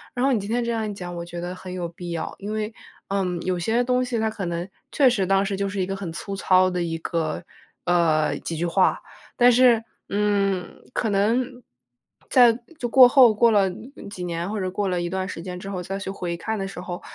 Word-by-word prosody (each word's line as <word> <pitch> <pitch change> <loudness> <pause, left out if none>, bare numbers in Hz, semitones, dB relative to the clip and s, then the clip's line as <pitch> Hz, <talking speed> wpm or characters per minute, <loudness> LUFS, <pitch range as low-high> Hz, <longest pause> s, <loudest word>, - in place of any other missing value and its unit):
然 250 +1 +1
后 275 - +3
你 240 - +2
今 200 +1 -6
天 240 +2 0
这 235 - -1
样 220 -2 -1
一 - - -4
讲， 180 -3 -7
我 170 - -5
觉 175 0 -7
得 175 +1 -4
很 185 0 -9
有 180 -1 -3
必 175 +1 -9
要。 170 - -4
因 205 +1 -5
为， 215 +1 -3 0.4
嗯， 185 -3 -1
有 180 -1 -1
些 225 +8 +1
东 250 0 +1
西， 250 -2 -2
它 220 - +1
可 210 -3 -5
能 170 +1 -3 0.2
确 280 - +4
实 215 -7 +2
当 195 +1 +3
时 200 0 -2
就 200 0 -1
是 195 0 -4
一 185 - +1
个 195 +1 -3
很 195 -4 -5
粗 195 +4 -5
糙 185 -1 +4
的 180 -1 -2
一 165 -1 -2
个 160 0 -2 0.4
呃， 165 -3 +2
几 165 - -5
句 170 - -1
话。 185 +2 +2 0.4
但 245 0 +6
是， 240 -2 +5 0.3
嗯， 200 -2 0
可 225 - 0
能 240 +5 0 0.7
在 245 -2 +7 0.3
就 240 -5 -3
过 255 +1 +9
后 245 -3 +6
过 230 +2 +4
了 200 -3 +4 0.4
几 180 - -6
年， 170 +1 -3
或 215 0 -3
者 185 -1 -1
过 195 +2 -2
了 180 -1 -1
一 175 - -2
段 190 +1 -2
时 165 - -6
间 180 +1 -6
之 195 - -7
后， 185 -2 -4
再 195 +2 -4
去 195 - -5
回 180 -3 -4
看 220 +5 -3
的 195 - -2
时 195 - -8
候， 175 -1 -6
195 Hz, 260 characters per minute, -24 LUFS, 175-220 Hz, 0.7 s, 过